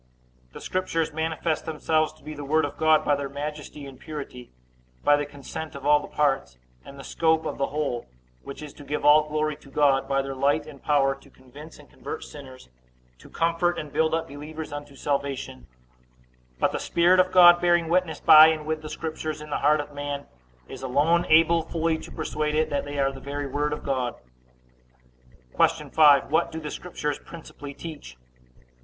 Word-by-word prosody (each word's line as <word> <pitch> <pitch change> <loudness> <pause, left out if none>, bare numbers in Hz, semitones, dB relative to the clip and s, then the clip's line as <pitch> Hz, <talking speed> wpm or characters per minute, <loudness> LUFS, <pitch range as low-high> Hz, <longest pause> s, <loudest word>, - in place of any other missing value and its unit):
A. - - -35
The - - -9
Scriptures 165 -4 -2
manifest 160 0 -2
themselves 155 0 0
to 155 - -23
be 155 - -7
the 145 -1 -8
Word 155 +2 +2
of 145 - -6
God, 155 -1 +3
by 145 - +3
their 140 -1 -4
majesty 150 +1 -6
and 135 -2 -12
purity; 140 -5 -8 0.5
by 145 - +5
the 145 0 -2
consent 145 +2 -8
of 140 0 -9
all 150 0 +5
the - - -9
parts, 135 - 0 0.3
and 140 - -12
the 135 - -9
scope 160 +1 +1
of - - -4
the 140 - +1
whole, 145 -5 -3 0.3
which 140 +2 -9
is 150 - -9
to 145 - -13
give 145 +1 -3
all 150 +1 +6
glory 155 0 -1
to 150 - -17
God; 135 -1 +2
by 135 0 +1
their 135 0 -5
light 140 +3 +1
and 145 -3 -12
power 140 -2 +2
to 135 - -17
convince 145 +5 -14
and 145 - -16
convert - - -8
sinners, 130 - -12 0.5
to - - -15
comfort 170 +1 0
and 150 -2 -7
build 160 0 +2
up 165 - -3
believers 150 +2 -8
unto 145 -1 -8
salvation: 140 - -3 0.9
but - - +2
the - - -3
Spirit 175 +2 +3
of 185 0 +3
God 175 -1 +8
bearing 175 -1 +3
witness 170 -2 0
by 155 0 +9
and 155 -1 -1
with 155 0 -2
the 155 - -8
Scriptures 155 -1 -5
in 150 0 -10
the - - -1
heart 150 +1 +3
of 145 0 -6
man, 145 0 -5 0.4
is - - -9
alone 150 +7 +2
able 165 +1 +5
fully 160 0 -1
to - - -11
persuade 150 -1 -2
it 155 0 +1
that 145 - -1
they 145 0 -6
are 135 -1 +1
the 135 - -10
very 145 +1 -5
Word 145 +2 -2
of 150 - -5
God. 130 -3 -2 1.4
Q. - - +1
5. 145 -3 +5
What 170 +2 +2
do 160 - -5
the 150 -1 -6
Scriptures 150 -5 -4
principally 145 -4 -11
teach? 150 - -9
150 Hz, 200 wpm, -25 LUFS, 140-160 Hz, 1.4 s, by